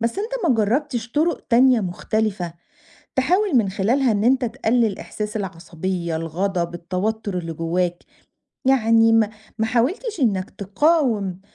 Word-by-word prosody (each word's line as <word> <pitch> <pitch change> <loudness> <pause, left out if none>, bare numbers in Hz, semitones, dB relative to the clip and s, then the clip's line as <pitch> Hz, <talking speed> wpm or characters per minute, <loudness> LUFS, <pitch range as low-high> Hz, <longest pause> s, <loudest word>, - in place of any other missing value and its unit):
بس 230 +1 0
أتت 425 +4 -4 0.2
ما 260 - +4
جربتش 240 +2 -1
طرق 315 +2 +1
تانية 250 0 +5
مختلفة، 190 -1 -2 0.6
تحاول 350 +5 +2
من 220 -4 +3
خلالها 230 +6 +1
إن 205 +1 0
أنت 255 +1 +3
تقلل 225 -2 0
إحساس 210 0 -5
العصبية، 170 -2 -4
الغضب، 170 +2 -2
التوتر 185 +3 -3
اللي 165 -2 -5
جواك؟ 175 +2 -2 0.6
يعني 225 -3 +4
م 225 -2 +4 0.3
ما 220 - +2
حاولتش 320 - -1
إنك 200 -7 +1
تقاوم 210 - 0
220 Hz, 130 wpm, -22 LUFS, 185-255 Hz, 0.6 s, تانية